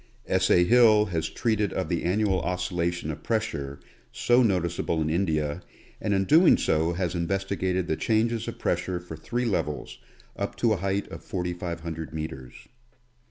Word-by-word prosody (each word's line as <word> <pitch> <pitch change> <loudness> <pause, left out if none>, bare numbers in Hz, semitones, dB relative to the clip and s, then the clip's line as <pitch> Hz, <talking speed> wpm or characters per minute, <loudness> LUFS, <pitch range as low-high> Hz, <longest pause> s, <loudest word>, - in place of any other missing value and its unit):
S. - - +1
A. 90 - +6
Hill 110 0 +6
has 80 -1 -1
treated 110 -4 0
of 95 - -2
the 85 -2 -1
annual 95 +1 +1
oscillation 90 -2 -2
of 75 0 -8
pressure, 70 -11 -2 0.3
so 120 +1 +3
noticeable 85 -6 0
in 80 0 0
India, 80 -2 0 0.4
and 105 - -1
in 95 -1 +1 0.3
so 80 - +1
doing 85 - -1
has 90 -2 -1
investigated 95 +1 -1
the 80 - 0
changes 115 +4 0
of - - -5
pressure 90 -1 -1
for 85 -2 -9
three 120 +8 -3
levels, 75 -9 -2 0.4
up - - -3
to 115 -2 +2
a - - -1
height 100 +2 -1
of - - -9
4500 85 -3 -4
meters. 65 -6 -7
90 Hz, 160 wpm, -26 LUFS, 80-100 Hz, 0.4 s, A